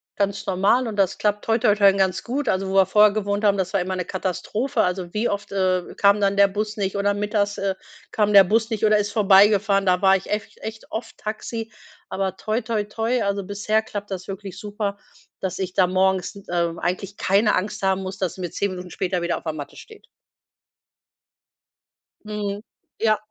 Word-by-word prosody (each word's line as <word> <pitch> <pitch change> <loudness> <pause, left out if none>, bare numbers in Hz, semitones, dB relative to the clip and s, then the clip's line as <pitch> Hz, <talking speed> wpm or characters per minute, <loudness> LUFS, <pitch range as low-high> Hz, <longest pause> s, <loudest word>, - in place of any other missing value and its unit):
ganz 200 0 -2
normal 200 +7 +2
und 220 - -4
das 195 -2 +1
klappt 210 -1 0
toi, 225 +1 +2
toi, 215 -3 +3
toi, 200 -2 +5
ganz 190 -2 0
gut, 270 +4 -2
also, 190 0 0
wo - - -3
wir 195 -1 +5
vorher 210 +2 +5
gewohnt 205 0 -2
haben, 205 -1 +4
das 190 -1 -1
war 195 - +2
immer 185 +1 -3
'ne 180 - -2
Katastrophe. 190 +8 -2
Also 180 -1 -2
wie 215 +3 0
oft, 205 0 -4
äh, 185 -2 0
kam 200 +1 +4
dann 200 0 +1
der 200 0 +7
Bus 210 +2 -3
nicht 195 -2 -2
oder 205 0 +1
mittags, 205 0 -1
äh, 195 -1 -1 0.4
kam 210 -1 +1
der 200 -1 +10
Bus 225 +4 +1
nicht 220 -1 -3
oder 215 0 +5
ist 205 0 -1
vorbeigefahren. 200 -1 +4
Da 180 -1 +2
war 195 -1 +5
ich 195 - -4
echt 210 0 -3
echt 220 0 -8
oft 225 +1 -5
Taxi, 225 +1 -5 0.4
aber 190 -1 -2
toi, 220 +3 -2
toi, 220 -2 -1
toi, 225 +3 -1
also 200 -1 -1
bisher 210 +3 0
klappt 205 -2 -6
das 185 -1 -6
wirklich 195 -1 -7
super, 205 -1 -4 0.4
dass 185 -1 -4
ich 185 -2 -3
da 185 - +5
morgens, 190 +1 +1 0.2
ähm, 170 -1 -1
eigentlich 185 +3 -3
keine 205 +3 +2
Angst 195 +2 -2
haben 190 0 +1
muss, 190 0 -6
dass 185 -3 -2
sie 185 - -9
mir 175 - -3
10 200 +4 -2
Minuten 180 -1 -7
später 180 0 -2
wieder 170 0 -1
auf - - -10
der 160 - -3
Matte 145 -2 -8
steht. 435 -2 -14 2.2
Mhm, 210 -1 -4 0.4
ja. 215 -1 +3
200 Hz, 205 wpm, -23 LUFS, 190-210 Hz, 2.2 s, der